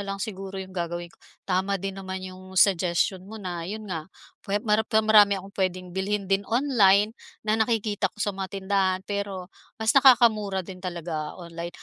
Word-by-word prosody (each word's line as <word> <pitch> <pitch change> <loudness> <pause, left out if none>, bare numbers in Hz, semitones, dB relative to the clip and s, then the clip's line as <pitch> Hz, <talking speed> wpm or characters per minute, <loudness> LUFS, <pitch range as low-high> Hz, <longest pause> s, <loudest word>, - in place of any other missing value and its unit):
lang 195 - -3
siguro 195 -2 -6
yung 190 0 -7
gagawin 175 -1 -4
ko. - - -25 0.3
Tama 190 +1 0
din 195 +1 -4
naman 190 0 -5
yung 185 0 -10
suggestion 180 0 +3
mo 220 - -8
na 175 -4 -5
yun 215 +2 -5
nga 170 -4 -5 0.3
puwe 200 +1 -2
maram 210 0 +3
pero 220 -1 +3
marami 210 -2 +6
akong 195 +1 -9
puwedeng 185 -1 -2
bilhin 200 +2 -1
din 195 +1 +1
online 220 -5 +4 0.3
na 215 +1 +1
nakikita 220 -2 +1
ko - - -32
sa 210 -1 -1
mga 190 0 -4
tindahan 190 -1 +1
pero 195 -2 -4 0.2
mas 220 -1 +2
nakakamura 225 -8 +5
din 185 0 -10
talaga 170 -4 -4
online. 170 -1 -7
195 Hz, 180 wpm, -26 LUFS, 185-210 Hz, 0.3 s, marami